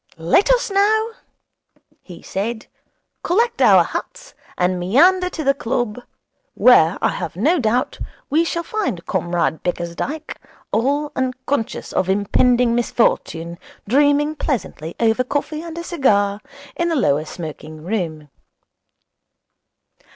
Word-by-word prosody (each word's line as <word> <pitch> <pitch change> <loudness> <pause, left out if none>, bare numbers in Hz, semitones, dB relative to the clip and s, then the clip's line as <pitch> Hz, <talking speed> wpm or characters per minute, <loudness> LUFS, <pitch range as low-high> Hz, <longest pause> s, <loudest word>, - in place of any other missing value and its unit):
'Let 170 - +2
us - - +1
now,' 435 +3 +2 0.9
he 175 -3 -13
said, 220 +3 -4 0.6
'collect 465 +7 +1
our - - +7
hats - - -7 0.2
and 180 0 +1
meander 360 - +4
to 325 -3 -5
the 275 0 +3
club, 240 -3 -2 0.5
where, 180 -9 +5
I - - +4
have 175 -4 -5
no 310 - +2
doubt, 240 +1 0 0.3
we 315 +3 +2
shall 340 0 -2
find 375 - -3
Comrade 170 -2 -1
Bickersdyke, 175 - -4 0.3
all 285 +6 0
unconscious 260 -1 -3
of 185 - 0
impending 235 +5 +2
misfortune, 170 -8 0 0.3
dreaming 290 +5 +3
pleasantly 195 - -4
over 230 +2 +2
coffee 290 +4 -3
and 335 -1 -8
a 340 - -4
cigar 205 - +1 0.3
in 345 0 0
the 330 - 0
lower 150 - +2
smoking 155 -1 -8
room.' 165 -6 -3
245 Hz, 120 wpm, -20 LUFS, -, 0.9 s, our